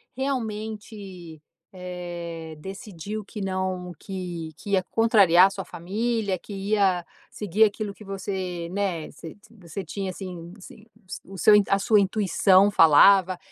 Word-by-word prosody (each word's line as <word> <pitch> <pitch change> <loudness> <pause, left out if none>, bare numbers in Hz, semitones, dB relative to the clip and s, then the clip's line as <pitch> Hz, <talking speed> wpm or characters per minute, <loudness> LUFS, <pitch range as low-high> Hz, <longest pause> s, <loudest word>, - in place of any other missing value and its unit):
realmente, 210 - -5 0.3
eh, 175 -3 -7
decidiu 200 +3 -7
que 210 +1 -8
não 185 -1 -3
que 175 -4 -6
que 200 +4 -9
ia 190 -2 +3
contrariar 200 -6 +5
a - - -3
sua 195 -1 -7
família, 200 +2 -2
que 205 - -10
ia 195 -3 +1 0.2
seguir 210 +2 +2
aquilo 205 -1 -3
que 210 - -14
você, 190 -3 -4
né, 185 -5 -2
você 165 - -11 0.2
você 190 -3 -8
tinha, 195 -2 -5
assim 180 -2 -8
assim, 210 +2 -14 0.4
o 195 0 -11
seu 210 +5 +5 0.2
a 195 - +4
sua 210 +1 +3
intuição 195 0 +3
falava, 185 +3 +6
190 Hz, 135 wpm, -25 LUFS, 180-205 Hz, 0.4 s, falava